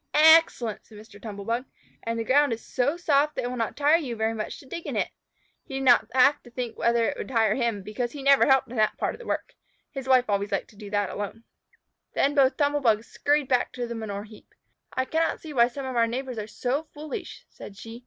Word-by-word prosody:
"Excellent!" 310 -8 +5
exclaimed 215 -2 -15
Mr. 205 -2 -16
Tumble 205 -3 -7
bug. 235 +4 -1 0.4
"And 230 0 -3
the 230 - -1
ground 285 +2 +3
is 225 - -7
so 280 +6 0
soft 300 -3 +2
that - - -2
it 245 - -2
will - - -4
not 230 -2 -3
tire 295 +3 +5
you 255 -7 -4
very 220 0 0
much 215 -1 -5
to - - -15
dig 335 +5 -7
in - - -3
it." - - 0 0.5
He 270 - -8
did 270 - -2
not 245 -3 +5
have 275 +3 +5
to 240 - -15
think 240 -1 -5
whether 235 0 +2
it - - -2
would - - -5
tire 225 -4 +2
him, 230 -5 -1
because 235 +4 -3
he 285 -2 -8
never 275 0 +5
helped 265 -1 +4
in 240 +1 -8
that 215 0 +2
part - - -1
of - - -12
the 480 - -11
work. - - -3 0.4
His 270 -3 -6
wife 255 -1 +5
always 200 0 -1
liked - - -2
to - - -21
do 205 0 -10
that 205 -2 0
alone. 205 +2 -6 0.7
Then 280 - +2
both 270 -2 +3
Tumble 290 0 +2
bugs 225 -3 +2
scurried 290 -1 +1
back 250 -2 +1
to 245 -1 -3
the 235 - -5
manure 210 -3 -5
heap. 215 0 -16 0.4
"I 260 - -1
cannot 325 +4 0
see 310 -2 -9
why 235 -3 +5
some 265 +2 -7
of 260 -1 -4
our 230 -1 +3
neighbors 250 0 -4
are 210 - -5
so 260 +7 -2
foolish," 300 -1 -7
said 200 - -12
she. 225 +2 -9
245 Hz, 250 wpm, -26 LUFS, 225-275 Hz, 0.7 s, Excellent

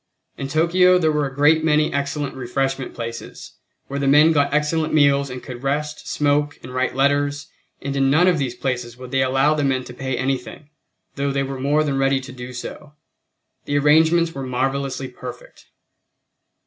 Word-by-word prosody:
In 135 - -5
Tokyo 175 +5 +4
there 160 -3 +2
were 150 -2 0
a 135 - -10
great 155 +3 +4
many 155 -1 +2
excellent 140 0 -2
refreshment 135 +1 -3
places, 115 0 -8 0.3
where 140 +1 -4
the 140 - 0
men 150 +4 +6
got 145 -2 +2
excellent 155 +2 0
meals 140 -2 +3
and 125 0 -7
could 125 -1 -8
rest, 145 +2 -3
smoke, 145 0 0
and 125 - -9
write 130 0 -1
letters, 145 +1 +1 0.4
and 140 0 -3
in 135 -1 +2
none 160 +6 +4
of 175 -4 +3
these 130 -3 -2
places 125 -2 -3
would 125 -1 -10
they 135 -1 +1
allow 135 +3 +3
the 150 -1 -1
men 130 -2 0
to 125 - -10
pay 130 0 -3
anything, 135 +2 -4 0.5
though 140 0 0
they 140 0 0
were 135 -1 -5
more 145 +3 +2
than 140 -3 -1
ready 135 0 +2
to 130 0 -10
do 125 0 -8
so. 145 +4 -8 0.7
The 145 - 0
arrangements 160 +3 +4
were 135 - -6
marvelously 135 +1 -2
perfect. 125 -1 -11
140 Hz, 185 wpm, -21 LUFS, 130-150 Hz, 0.7 s, men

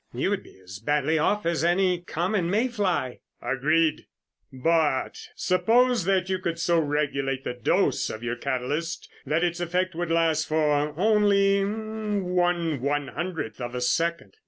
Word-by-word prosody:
You - - 0
would - - -1
be - - -18
as 95 +1 -10
badly 150 +4 +1
off 210 +6 +1
as 165 -1 0
any 180 +1 +2
common 175 +1 -1
may 220 +7 +1
fly." 185 - -1 0.2
"Agreed, 150 +6 +1 0.4
but 150 +1 +1 0.2
suppose 225 +4 +2
that 190 -1 +1
you 190 -1 -1
could 170 -2 -3
so 170 0 +2
regulate 140 -3 -1
the - - -3
dose 125 -2 +1
of 110 - -7
your 120 0 -2
catalyst 140 +6 -3 0.2
that 155 +4 +1
its 175 -1 0
effect 180 +2 -1
would 175 0 -3
last 165 -1 +2
for 150 -1 +1
only 200 -1 +3
one 190 - -1
one 145 0 -1
hundredth 165 -11 -5
of 120 0 -5
a 125 - -3
second. 165 - -1
165 Hz, 155 wpm, -26 LUFS, 145-185 Hz, 0.4 s, only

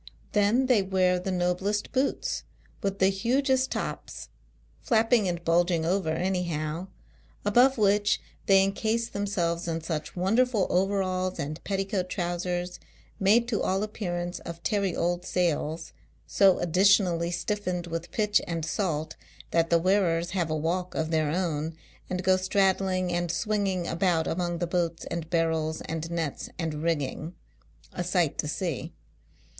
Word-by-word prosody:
Then, 210 +6 +3
they 250 -5 +4
wear 185 -1 +2
the 185 - -4
noblest 185 +3 0
boots, 270 +1 0 0.4
with 195 0 -1
the 190 0 +4
hugest 260 +6 +1
tops - - -5 0.3
— - - -34
flapping 225 -2 +3
and 175 -1 -3
bulg 170 +2 +3
ing 165 -2 0
over 180 -1 +1
anyhow; 170 -1 -2 0.6
above 245 +6 +5
which, 205 -1 +3 0.3
they 195 -1 +6
encase 220 +4 -1
i 200 0 -1
selves 175 -3 -1
in 165 -1 -2
such 160 -1 -4
wonderful 220 +3 +2
overalls 185 -1 0
and 150 +3 -5
petticoat 195 -2 -1
trowsers, 175 0 -2 0.4
made 220 +5 +4
to 215 - 0
all 190 +2 0
appearance 175 -5 -3
of 170 0 -8
tarry 200 -4 0
old 175 +1 0
sails, 165 -3 -1 0.3
so 195 -2 +4
additionally 180 -1 +3
stiffened 180 -1 -2
with 165 0 -5
pitch 210 -1 +2
and 165 -2 -2
salt, 160 -3 -2 0.4
that 165 0 +2
the 170 - +5
wearers 175 -2 +2
have 175 -3 -1
a 155 - 0
walk 175 +4 -2
of 160 0 -1
their 155 -2 +2
own, 160 -2 -1 0.3
and 185 0 -2
go 185 0 +4
straddling 185 -1 +1
and 175 0 -1
swinging 200 -4 0
about, 170 -1 +1
among 175 0 -1
the 175 - -1
boats 170 -1 -1
ami 170 0 -1
barrels 160 -1 0
and 165 0 -4
nets 165 -4 -3
and 160 -3 -3
rigging, 160 +1 -2 0.6
a 180 - -2
sight 175 -4 +1
to 150 - 0
see. 165 -1 -3
180 Hz, 150 wpm, -27 LUFS, 165-195 Hz, 0.6 s, they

